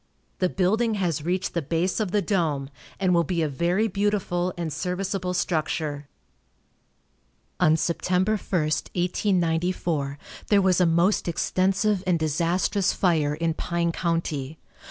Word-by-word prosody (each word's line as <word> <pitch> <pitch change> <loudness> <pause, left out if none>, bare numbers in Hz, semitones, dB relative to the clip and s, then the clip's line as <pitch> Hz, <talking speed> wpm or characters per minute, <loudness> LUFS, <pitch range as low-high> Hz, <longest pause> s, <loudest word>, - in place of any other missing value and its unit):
The 185 - +2
building 215 +5 +1
has 170 -7 -1
reached 180 +3 -1
the 170 - 0
base 165 +6 -1
of 215 -3 0
the 205 +1 +1
dome, 155 -8 -1 0.3
and 185 -2 +2
will 170 -1 +4
be 170 0 -1
a - - +1
very 175 +9 +1
beautiful 195 -3 0
and 165 -3 -3
serviceable 180 +2 -2
structure. 155 -4 -1 1.5
On 155 - +5
Sept. 170 +2 -2
1, 180 0 +3
1894, 175 -4 0 0.3
there 205 - +4
was 185 -2 +3
a 180 - +5
most 170 +5 +2
extensive 190 +3 +1
and 180 -2 +3
disastrous 170 +5 +1
fire 155 -5 +1
in 165 +1 0
Pine 170 +1 -1
county. 160 -4 -2
175 Hz, 135 wpm, -25 LUFS, 160-185 Hz, 1.5 s, On